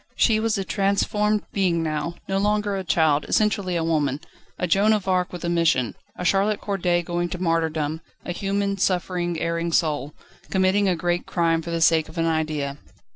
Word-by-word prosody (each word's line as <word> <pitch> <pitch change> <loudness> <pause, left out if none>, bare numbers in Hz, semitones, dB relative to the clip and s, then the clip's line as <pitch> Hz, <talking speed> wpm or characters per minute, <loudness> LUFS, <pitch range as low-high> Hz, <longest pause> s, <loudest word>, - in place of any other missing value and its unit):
She 220 -2 +3
was 225 -1 0
a 195 - -1
transformed 210 +2 +1
being 175 -4 +1
now, 155 +1 -2
no 195 0 0
longer 210 0 +1
a 190 - -3
child, 155 -4 +2
essentially 200 -4 +1
a 165 - 0
woman 150 -4 0 0.4
a - - -1
Joan 200 +5 +3
of 205 -3 -1
Arc 180 -1 +1
with 175 -1 -6
a - - -1
mission, 165 -9 +2 0.2
a 180 - -4
Charlotte 200 +3 +2
Corday 180 -4 0
going 175 0 -2
to 180 - -4
martyrdom, 160 -3 -1 0.2
a - - -3
human, 200 +2 -1
suffering, 175 -2 0
erring 170 0 -1
soul, 150 -3 0 0.3
committing 190 +1 +2
a 180 - +2
great 175 +1 -1
crime 165 -2 +1
for 170 - -7
the 165 0 -2
sake 160 -1 +4
of 160 - -12
an 165 - +1
idea. 155 -3 -1
175 Hz, 185 wpm, -23 LUFS, 165-195 Hz, 0.4 s, sake